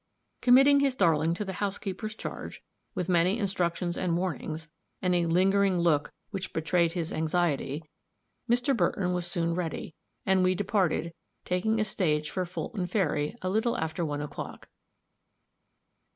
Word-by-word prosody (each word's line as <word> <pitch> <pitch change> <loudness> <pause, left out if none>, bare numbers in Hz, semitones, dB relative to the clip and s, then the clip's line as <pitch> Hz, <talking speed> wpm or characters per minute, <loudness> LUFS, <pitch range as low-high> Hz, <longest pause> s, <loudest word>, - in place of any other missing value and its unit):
Committing 270 +3 +7
his 275 -2 +2
darling 165 - +3
to 210 - -3
the 190 - -4
housekeeper's 205 +1 -3
charge, - - -7 0.3
with 180 - -2
many 180 +3 +3
instructions 180 -4 -1
and 175 -2 +1
warnings, 165 -3 -3 0.3
and 180 -1 +1
a 175 -1 +2
lingering 190 +2 +3
look 165 -4 +2 0.2
which 195 -2 -5
betrayed 165 +1 +1
his 170 -3 -3
anxiety, 155 -2 0 0.7
Mr. 245 +3 +3
Burton 180 -2 +1
was 175 -1 -1
soon 170 -2 0
ready, 165 -2 -3 0.3
and 190 -1 +3
we 185 0 +3
departed, 180 -4 0 0.3
taking 220 +5 +1
a 215 - +2
stage 155 -6 0
for 185 -1 -1
Fulton 185 +1 -4
Ferry 160 -4 0
a 185 - 0
little 220 +3 +1
after 160 +1 -2
one 145 -2 -2
o'clock. 150 - -7
180 Hz, 145 wpm, -28 LUFS, 165-195 Hz, 0.7 s, Committing